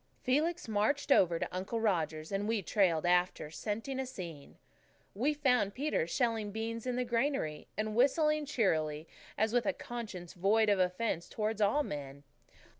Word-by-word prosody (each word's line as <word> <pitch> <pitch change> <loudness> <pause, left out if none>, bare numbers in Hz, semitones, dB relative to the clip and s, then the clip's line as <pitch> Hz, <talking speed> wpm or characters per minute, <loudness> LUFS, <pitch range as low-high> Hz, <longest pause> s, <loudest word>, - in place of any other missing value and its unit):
Felix 315 +6 +1
marched 220 +8 0
over 175 -9 +5
to - - -2
Uncle 190 +5 -2
Roger's, 160 -7 -1
and 200 +1 -1
we 220 -3 0
trailed 175 -5 +2
after, 175 -3 +1
scenting 225 - -4
a 265 - -2
scene. 170 - -8 0.6
We 250 +9 +1
found 250 -8 +2
Peter 275 - 0
shelling 225 +1 0
beans 225 +2 -4
in 250 - 0
the 250 0 0
granary, 235 - -1
and 215 0 -2
whistling 300 +4 +3
cheerily, 160 - 0 0.3
as 220 +1 +1
with 245 -1 +2
a 290 - +2
conscience 210 -8 -7
void 210 +4 +3
of 200 -2 +3
offence 180 -1 0
towards 215 0 -2
all 215 +9 +3
men. 140 - -6
215 Hz, 160 wpm, -32 LUFS, 180-250 Hz, 0.6 s, over